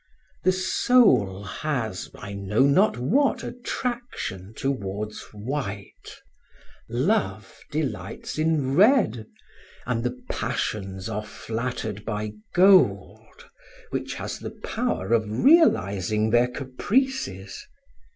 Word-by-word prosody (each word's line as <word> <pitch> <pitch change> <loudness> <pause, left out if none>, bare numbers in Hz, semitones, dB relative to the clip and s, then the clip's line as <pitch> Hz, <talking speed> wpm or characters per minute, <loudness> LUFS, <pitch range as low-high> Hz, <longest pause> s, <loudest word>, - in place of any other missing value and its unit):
The 185 - +5
soul 185 - +3
has 110 -3 -3
I 100 0 -8
know 100 +5 +1
not 140 +8 +4
what 250 - +2
attraction 240 - -4
towards 105 -5 -3
white, 105 -2 -6 0.7
love 130 - -1
delights 130 -5 -4
in 155 -4 +1
red, 190 - +4 0.6
and 115 -2 -1
the 125 0 -3
passions 95 -3 -3
are 105 -1 -3
flattered 110 -1 -4
by 105 -1 -3 0.2
gold, 190 +1 +3 0.4
which - - -3
has - - -5
the - - -8
power 235 - -1
of 110 -2 +3
realizing 110 - +3
their 120 +1 +4
caprices. 130 - -2
120 Hz, 95 wpm, -25 LUFS, -, 0.7 s, The